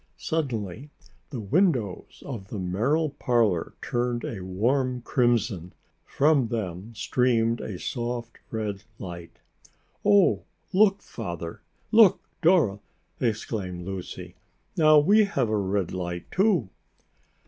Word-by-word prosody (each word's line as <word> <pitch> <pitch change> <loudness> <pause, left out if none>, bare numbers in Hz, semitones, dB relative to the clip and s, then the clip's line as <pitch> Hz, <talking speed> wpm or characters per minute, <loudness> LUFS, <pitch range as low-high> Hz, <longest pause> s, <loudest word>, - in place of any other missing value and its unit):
Suddenly 130 - -3 0.4
the 135 -4 -5
windows 120 - 0
of 115 -8 -6
the 105 - -6
Merrill 120 - 0
parlor 115 - +1
turned 120 -1 -1
a 110 - -5
warm 125 +7 0
crimson. 115 -9 +1 0.3
From 145 -4 +3
them 110 -1 -4
streamed 115 -1 +1
a 95 - -5
soft 120 +2 -4
red 105 -3 -3 0.2
light. 85 -4 -8 0.7
"Oh, 205 -2 +5 0.3
look, 200 0 +4
Father! 85 -7 -6 0.3
Look, 215 -4 +7 0.2
Dora!" 160 - +4 0.4
exclaimed 105 -6 -2
Lucy. 95 -1 -6 0.4
"Now, 155 -1 +6
we 205 +8 +5
have 135 - 0
a 110 - +1
red 100 -2 0
light, 90 -1 -5
too!" 185 - +2
115 Hz, 110 wpm, -26 LUFS, 95-140 Hz, 0.7 s, Look